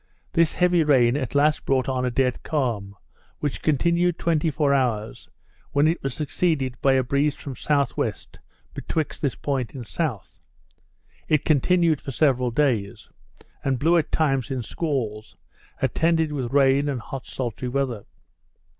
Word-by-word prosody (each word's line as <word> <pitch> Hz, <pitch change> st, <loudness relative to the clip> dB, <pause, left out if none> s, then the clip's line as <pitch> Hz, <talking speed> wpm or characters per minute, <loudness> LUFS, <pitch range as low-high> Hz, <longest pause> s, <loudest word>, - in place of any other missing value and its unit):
This 165 Hz, -2 st, +2 dB
heavy 180 Hz, -2 st, +3 dB
rain 130 Hz, -5 st, +4 dB
at 140 Hz, -2 st, -3 dB
last 150 Hz, +2 st, +3 dB
brought 130 Hz, -2 st, +1 dB
on 130 Hz, -1 st, -1 dB
a -, -, +1 dB
dead 125 Hz, 0 st, 0 dB
calm, 115 Hz, -10 st, -2 dB, 0.4 s
which 145 Hz, -2 st, -3 dB
continued 170 Hz, +3 st, +2 dB
twenty 165 Hz, -1 st, +1 dB
four 145 Hz, -1 st, +1 dB
hours, 115 Hz, -5 st, -1 dB, 0.4 s
when 145 Hz, +2 st, +4 dB
it 165 Hz, +2 st, 0 dB
was 135 Hz, -, -3 dB
succeeded 150 Hz, -4 st, -1 dB
by 135 Hz, -, +4 dB
a 130 Hz, -1 st, +3 dB
breeze 140 Hz, +3 st, +1 dB
from 140 Hz, -, -8 dB
S.W. 140 Hz, +1 st, 0 dB, 0.6 s
Betwixt 160 Hz, -2 st, -3 dB
this 140 Hz, -4 st, 0 dB
point 130 Hz, -6 st, -3 dB
and 125 Hz, -3 st, -6 dB
S. 130 Hz, -, -4 dB, 0.9 s
it 155 Hz, -2 st, +1 dB
continued 165 Hz, +1 st, +3 dB
for -, -, -7 dB
several 130 Hz, -3 st, +2 dB
days; 115 Hz, -6 st, -1 dB, 0.5 s
and 135 Hz, -2 st, 0 dB
blew 165 Hz, +7 st, +3 dB
at 165 Hz, -3 st, +1 dB
times 135 Hz, -6 st, +1 dB
in 130 Hz, -3 st, -3 dB
squalls, 115 Hz, -9 st, -3 dB, 0.5 s
attended 160 Hz, -1 st, +2 dB
with 130 Hz, -5 st, -3 dB
rain 140 Hz, +1 st, +3 dB
and 135 Hz, -3 st, -2 dB
hot 130 Hz, +3 st, -8 dB
sultry 125 Hz, -1 st, -4 dB
weather. 125 Hz, -5 st, -2 dB
140 Hz, 150 wpm, -24 LUFS, 125-155 Hz, 0.9 s, rain